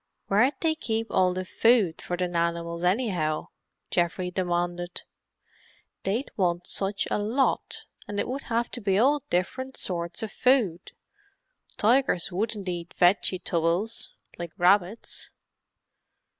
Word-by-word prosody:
"Where'd 245 +8 +4
they 325 -1 +3
keep 225 -7 -2
all 185 -1 +3
the 185 +1 -3
food 220 -4 +3
for 175 - -3
the 180 0 0
nanimals, 170 0 -1
anyhow?" 180 -6 0 0.4
Geoffrey 180 +1 0
demanded. 175 -1 -2 1.0
"They'd 225 +8 -2
want 175 -2 0
such 195 +2 -1
a - - +1
lot, 230 +7 0 0.2
and 205 0 -3
it - - 0
would 270 +2 -4
have 235 +1 -1
to 245 - -5
be 195 -2 +2
all 280 +6 +4
different 260 +9 -2
sorts 170 +3 -2
of 215 - -4
food. 230 -10 +1 0.8
Tigers 225 -6 +3
wouldn't 205 +1 -2
eat 175 -1 -4
vegi 185 +1 +4
tubbles, 175 +6 0 0.3
like 170 -2 -5
rabbits." 190 +4 +2
190 Hz, 130 wpm, -27 LUFS, 175-225 Hz, 1.0 s, Where'd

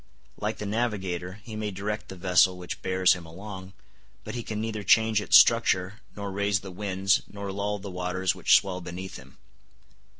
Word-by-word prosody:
Like - - -2
the 105 - -5
navigator, 100 -4 -2
he 110 -1 -8
may 110 -1 -3
direct 105 +2 -4
the 95 - -8
vessel 90 0 +3
which 90 -1 -7
bears 95 0 +3
him 90 - -7
along, 95 +2 -9 0.5
but - - -7
he 120 - -3
can 110 -2 -5
neither 110 -1 -3
change 110 +2 +4
its - - +7
structure, 110 -3 +3 0.2
nor 100 -1 -5
raise 100 -1 0
the 95 - -8
winds, 95 +1 +1
nor 100 -1 -5
lull 100 +1 -2
the 100 -1 -8
waters 90 +1 -1
which - - +4
swell 90 -2 +1
beneath 90 +2 -7
him. 65 +1 -16
95 Hz, 180 wpm, -27 LUFS, 90-105 Hz, 0.5 s, its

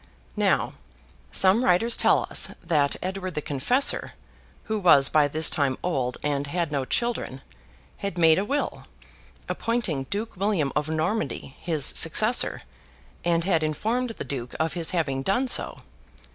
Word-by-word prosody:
Now, - - +1 0.6
some 195 +6 +4
writers 230 +4 +3
tell - - +3
us - - +3
that 150 -5 +1
Edward 185 -1 -4
the 150 - -2
Confessor, 245 - 0 0.5
who 220 -1 -3
was 145 -8 +5
by 150 -2 +3
this 155 +2 +2
time 140 -3 +1
old 130 -8 -2
and 145 -1 -1
had 170 0 -2
no 140 -3 -1
children, 235 - -2 0.5
had 200 -3 -5
made 165 0 +5
a - - 0
will, 280 +7 -3 0.6
appointing 210 - -2
Duke 210 - -5
William 185 -7 0
of 150 +1 -1
Normandy 160 -3 -2
his 160 -5 +1
successor, 215 +9 +3 0.6
and 170 -1 +1
had 170 -3 +1
informed 220 - -1
the - - -4
Duke 125 -3 -6
of 160 0 0
his 170 -2 -2
having 145 -7 -1
done 200 - 0
so. - - -2
165 Hz, 145 wpm, -25 LUFS, 145-205 Hz, 0.6 s, was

